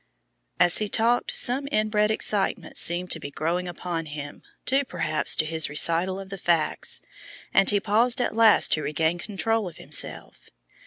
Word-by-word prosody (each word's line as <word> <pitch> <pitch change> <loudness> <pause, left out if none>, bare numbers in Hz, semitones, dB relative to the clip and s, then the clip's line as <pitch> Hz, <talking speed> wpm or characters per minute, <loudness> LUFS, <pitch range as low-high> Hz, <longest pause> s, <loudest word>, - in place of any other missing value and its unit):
As 175 0 +4
he 210 -1 -2
talked 235 +3 +1
some 265 +3 +2
inbred 215 -1 +1
excitement 205 -4 -1
seemed 175 +1 +1
to 165 - -1
be 145 - -7
growing 170 +5 -2
upon 175 -2 -5
him, 145 -1 -8 0.2
due, 270 +2 +2
perhaps, 165 - -1
to 155 - +1
his 160 -1 -1
recital 170 +5 +1
of 195 -1 -9
the 195 - -7
facts, 170 -3 -1 0.5
and 195 - +4
he 205 - +2
paused 230 +5 +1
at 245 - -1
last 225 -2 +5
to 155 - +2
regain 160 +4 -1
control 215 +1 -2
of 165 - -17
himself. - - -2
180 Hz, 165 wpm, -25 LUFS, 165-215 Hz, 0.5 s, last